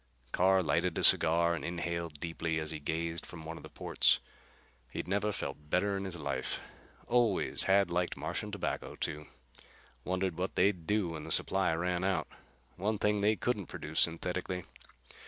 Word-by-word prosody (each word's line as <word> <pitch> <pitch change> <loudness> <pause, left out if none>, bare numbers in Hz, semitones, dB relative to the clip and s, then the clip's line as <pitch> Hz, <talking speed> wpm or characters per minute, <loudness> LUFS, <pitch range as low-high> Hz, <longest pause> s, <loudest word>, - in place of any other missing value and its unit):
Carr 95 +1 +4
lighted - - +1
a - - -1
cigar 85 +1 +6
and 85 - -4
inhaled 85 -3 -3
deeply 80 -1 -2
as 80 0 -3
he 80 - -4
gazed 80 +2 -2
from 80 -2 -10
one 80 +1 -5
of - - -10
the - - -11
ports. - - +3 0.7
He'd - - -5
never 100 +2 +1
felt 75 -6 -6
better 100 +5 +1
in 95 0 -3
his 90 -2 -4
life. - - -2 0.5
Always 120 -5 +2
had 100 0 +4
liked 90 0 0
Martian - - -3
tobacco, - - -3
too. 75 0 -3 0.8
Wondered 90 -1 -1
what 95 - -2
they'd 90 -5 +2
do 105 -3 +1
when 80 -2 -6
the - - -6
supply 95 -2 +3
ran 90 +1 -1
out. 95 0 0 0.5
One 105 +4 0
thing 105 0 +1
they 105 +2 +4
couldn't 105 -2 -1
produce 80 +1 -4
synthetically. 90 +2 0
90 Hz, 170 wpm, -32 LUFS, 80-95 Hz, 0.8 s, cigar